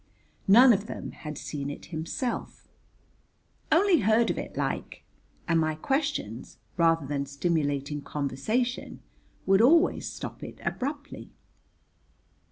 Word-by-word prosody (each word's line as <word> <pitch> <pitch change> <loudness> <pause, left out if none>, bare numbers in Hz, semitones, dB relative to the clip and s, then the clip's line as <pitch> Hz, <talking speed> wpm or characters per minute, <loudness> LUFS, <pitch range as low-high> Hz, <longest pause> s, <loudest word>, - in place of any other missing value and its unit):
None 240 +5 +8
of 205 +1 -2
them - - -6
had 150 -2 -8
seen 140 -2 -5
it 145 - -8
himself, 200 - -4 1.0
"only 350 +1 +5
heard 220 +3 +3
of - - -4
it - - -7
like," - - -3 0.4
and 165 -1 +3
my 155 -1 0
questions, 270 - -2 0.2
rather 165 -3 +3
than 140 0 -2
stimulating 145 -1 -1
conversation, 215 - -2 0.4
would 195 +2 +5
always 330 +9 +4
stop - - -7
it - - -9
abruptly. 285 +2 -4
175 Hz, 115 wpm, -27 LUFS, -, 1.0 s, None